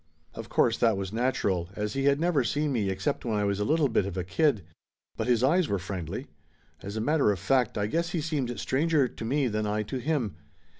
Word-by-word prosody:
Of -, -, -8 dB
course -, -, +2 dB
that 115 Hz, -4 st, +3 dB
was 95 Hz, +1 st, -4 dB
natural, 100 Hz, -8 st, 0 dB
as 105 Hz, 0 st, -2 dB
he 135 Hz, 0 st, -1 dB
had 140 Hz, 0 st, +4 dB
never 165 Hz, -5 st, +2 dB
seen 145 Hz, +5 st, 0 dB
me 110 Hz, -7 st, 0 dB
except 95 Hz, 0 st, -2 dB
when 110 Hz, -3 st, -1 dB
I 105 Hz, -, +1 dB
was 100 Hz, 0 st, 0 dB
a -, -, +1 dB
little 155 Hz, +6 st, +2 dB
bit 110 Hz, -5 st, +1 dB
of 95 Hz, -1 st, -5 dB
a 90 Hz, -, -1 dB
kid. 110 Hz, -, +1 dB, 0.5 s
But -, -, -3 dB
his 120 Hz, -1 st, +3 dB
eyes 165 Hz, +5 st, +3 dB
were 100 Hz, -, +1 dB
friendly. 90 Hz, -3 st, -5 dB, 0.6 s
As 100 Hz, +2 st, -6 dB
a -, -, -1 dB
matter 145 Hz, -3 st, +3 dB
of 100 Hz, -, -1 dB
fact 125 Hz, +5 st, +1 dB
I 105 Hz, -, +1 dB
guess 170 Hz, +10 st, -1 dB
he 175 Hz, -, -2 dB
seemed 135 Hz, -8 st, -2 dB
stranger 145 Hz, +2 st, +2 dB
to 115 Hz, -, -9 dB
me 135 Hz, +4 st, +1 dB
than 105 Hz, -1 st, -1 dB
I 105 Hz, +1 st, 0 dB
to 130 Hz, +5 st, -4 dB
him. 125 Hz, -, -1 dB
115 Hz, 235 wpm, -28 LUFS, 100-145 Hz, 0.6 s, had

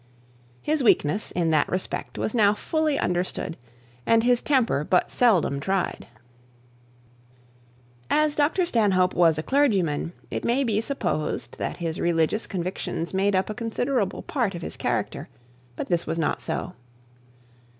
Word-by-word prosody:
His 305 Hz, -1 st, +1 dB
weakness 205 Hz, -, +2 dB
in 170 Hz, -2 st, 0 dB
that 155 Hz, -2 st, +2 dB
respect 185 Hz, +1 st, -4 dB
was -, -, -2 dB
now 210 Hz, -3 st, +4 dB
fully 310 Hz, +4 st, 0 dB
understood, 180 Hz, -1 st, -2 dB, 0.5 s
and 225 Hz, -, +3 dB
his 245 Hz, 0 st, +3 dB
temper 245 Hz, -, +2 dB
but 180 Hz, +3 st, +1 dB
seldom 185 Hz, -, +3 dB
tried. 190 Hz, +5 st, -2 dB, 2.0 s
As 305 Hz, -1 st, +2 dB
Dr 305 Hz, +5 st, +2 dB
Stanhope 195 Hz, -, +2 dB
was 165 Hz, -3 st, +4 dB
a 155 Hz, -, -2 dB
clergyman, 190 Hz, -, +1 dB, 0.2 s
it -, -, -3 dB
may 250 Hz, +4 st, +2 dB
be 220 Hz, -4 st, +1 dB
supposed 225 Hz, -, -3 dB
that -, -, -3 dB
his 165 Hz, -2 st, -3 dB
religious 170 Hz, +5 st, +1 dB
convictions 180 Hz, -2 st, -4 dB
made 195 Hz, +1 st, +2 dB
up 185 Hz, +3 st, 0 dB
a -, -, -3 dB
considerable 230 Hz, -2 st, -1 dB
part 235 Hz, -10 st, -1 dB
of 170 Hz, -, -6 dB
his -, -, -6 dB
character; -, -, -2 dB, 0.5 s
but -, -, -4 dB
this 175 Hz, -2 st, -1 dB
was 165 Hz, -, -2 dB
not 165 Hz, -, 0 dB
so. 180 Hz, -, -4 dB
195 Hz, 140 wpm, -25 LUFS, 170-245 Hz, 2.0 s, now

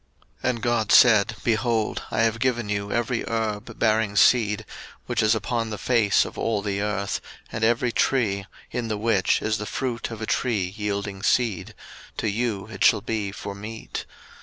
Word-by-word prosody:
01:001:029 -, -, +2 dB
And 120 Hz, -2 st, -2 dB
God 120 Hz, -3 st, +1 dB
said, 110 Hz, -2 st, +6 dB
Behold, 115 Hz, -1 st, 0 dB
I -, -, 0 dB
have 115 Hz, 0 st, +1 dB
given 120 Hz, -4 st, 0 dB
you 100 Hz, 0 st, -2 dB
every 120 Hz, +1 st, 0 dB
herb 110 Hz, -2 st, -3 dB
bearing 110 Hz, -2 st, +1 dB
seed, 105 Hz, -1 st, +4 dB, 0.4 s
which -, -, 0 dB
is 110 Hz, +1 st, +4 dB
upon 115 Hz, +1 st, -2 dB
the 105 Hz, -, -4 dB
face 110 Hz, -5 st, +3 dB
of -, -, -8 dB
all 105 Hz, -3 st, 0 dB
the 100 Hz, -1 st, -2 dB
earth, 100 Hz, -2 st, -2 dB, 0.3 s
and 110 Hz, -, -3 dB
every 120 Hz, +2 st, +2 dB
tree, 100 Hz, -7 st, +1 dB, 0.2 s
in 120 Hz, -2 st, -2 dB
the 110 Hz, -2 st, -2 dB
which 105 Hz, -3 st, +1 dB
is 110 Hz, -1 st, 0 dB
the 105 Hz, -, -5 dB
fruit 125 Hz, -3 st, -3 dB
of 115 Hz, -2 st, -7 dB
a 110 Hz, -, -3 dB
tree 105 Hz, -7 st, 0 dB
yielding 100 Hz, -2 st, -3 dB
seed; 110 Hz, -1 st, 0 dB, 0.4 s
to -, -, -1 dB
you 110 Hz, -1 st, -1 dB
it 105 Hz, -3 st, -4 dB
shall -, -, +5 dB
be 105 Hz, -2 st, -2 dB
for 100 Hz, 0 st, -6 dB
meat. 105 Hz, +3 st, -7 dB
110 Hz, 180 wpm, -24 LUFS, 100-115 Hz, 0.4 s, said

